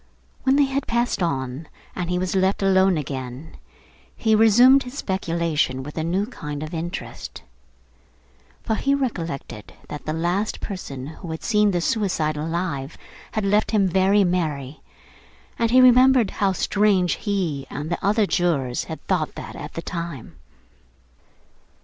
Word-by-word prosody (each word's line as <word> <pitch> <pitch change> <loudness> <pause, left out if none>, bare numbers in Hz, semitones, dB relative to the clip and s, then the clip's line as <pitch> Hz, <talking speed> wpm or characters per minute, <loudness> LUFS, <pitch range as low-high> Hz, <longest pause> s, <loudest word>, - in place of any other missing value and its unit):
When 265 0 +3
they 285 0 +5
had 270 0 -2
passed 235 -3 0
on, 140 -2 -2 0.3
and 175 -2 -3
he 180 - 0
was 185 +1 -2
left 190 +1 +1
alone 190 -2 +4
again, 130 0 -6 0.6
he 220 -1 +2
resumed 240 +5 +6
his 250 +1 -8
speculation 170 - -1
with 150 +2 -9
a 160 - -2
new 180 +5 0
kind 150 - -6
of 155 +2 -7
interest; 170 +1 -6 1.2
for 220 - -1
he 275 +5 +1
recollected 165 - -4 0.2
that 150 - -8
the - - 0
last 175 +6 -1
person 140 -10 -6
who 160 +4 -9
had 160 0 -5
seen 210 -2 +3
the 175 -3 0
suicide 180 -8 0
alive, 160 -2 -3 0.4
had 215 -2 -1
left 205 +2 +2
him 205 -3 +3
very 190 +3 +3
merry, 155 -6 -2 0.8
and 230 -1 +2
he 255 +2 +5
remembered 255 -2 +6
how 195 -1 +1
strange 190 -2 +2
he 170 -10 -2
and 150 +3 -5
the 175 - -3
other 210 +2 +3
jurors 155 -10 0
had 160 - -8
thought 175 -5 -1
that - - -8
at 150 +1 -8
the 165 - -4
time. 170 -9 -6
180 Hz, 150 wpm, -23 LUFS, 155-210 Hz, 1.2 s, resumed